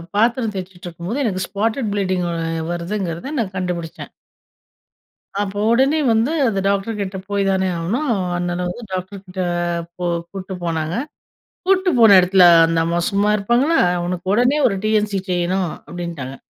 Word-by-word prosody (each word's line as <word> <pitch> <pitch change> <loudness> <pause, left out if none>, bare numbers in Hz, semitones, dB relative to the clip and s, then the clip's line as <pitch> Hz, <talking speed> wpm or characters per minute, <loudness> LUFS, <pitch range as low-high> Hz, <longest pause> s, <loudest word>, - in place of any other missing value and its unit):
பாத்திரம் 230 +1 +2
தேய்சிட்டுருக்கும்போது, 180 +5 -5
எனக்கு 185 -4 -1
spotted 220 +4 -1
bleeding 185 -3 0 0.5
வருதுங்கிறத 175 - -4
நான் 190 -4 -3
கண்டுபிடிச்சேன். 175 -3 -4 1.3
அப்போ 205 0 -2
உடனே 270 +6 +3
வந்து 225 +6 +2 0.2
அந்த 195 -4 0
டாக்டர் 200 +2 0
கிட்ட 190 -1 -4
போய் 200 -1 0
தானே 190 0 +1
ஆகணும். 235 - -1 0.3
அண்ணன 175 0 -2
வந்து 235 +6 -7
டாக்டர் 185 +1 -5
கிட்ட 185 0 -5 0.6
போ 180 - -3 0.3
கூட்டு 190 -1 -6
போனாங்க. 160 0 -2 0.7
கூட்டிட்டு 380 -1 +3
போன 215 -4 +8
இடத்துல 185 0 +4 0.2
அந்த 165 0 0
அம்மா 170 +1 0
சும்மா 200 +1 +2
இருப்பாங்களா? 245 +10 +2 0.2
அவனுக்கு 175 +1 -4
உடனே 245 +6 +3
ஒரு 195 - -1
டி.என்.சி 210 -2 +1
செய்யணும், 180 0 0 0.2
அப்படின்ட்டாங்க. 170 -7 -6
195 Hz, 135 wpm, -20 LUFS, 175-220 Hz, 1.3 s, போன